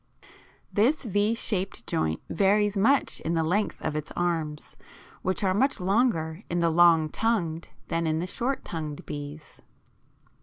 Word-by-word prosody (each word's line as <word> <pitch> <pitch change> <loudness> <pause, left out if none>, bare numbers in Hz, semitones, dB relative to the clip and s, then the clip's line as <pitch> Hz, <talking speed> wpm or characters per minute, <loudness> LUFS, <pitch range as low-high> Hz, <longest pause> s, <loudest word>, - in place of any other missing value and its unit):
This 255 +10 +2
V 210 0 +1
shaped 195 -4 -2
joint 80 - -1
varies 205 +3 +2
much 255 +8 +2
in 165 +1 -2
the 165 - +2
length 195 +6 0
of 155 - -2
its 155 +1 -4
arms, 165 -4 -2 0.5
which 185 +2 -1
are 190 -1 +2
much 260 +5 +2
longer 185 -4 +1
in 175 - 0
the 170 -1 +2
long 165 -1 +5
tongued 170 -4 -1 0.2
than 165 0 -1
in 155 0 +1
the 170 - -1
short 245 +8 -2
tongued 155 -3 -5
bees. 145 +1 -8
175 Hz, 150 wpm, -27 LUFS, 160-210 Hz, 0.5 s, long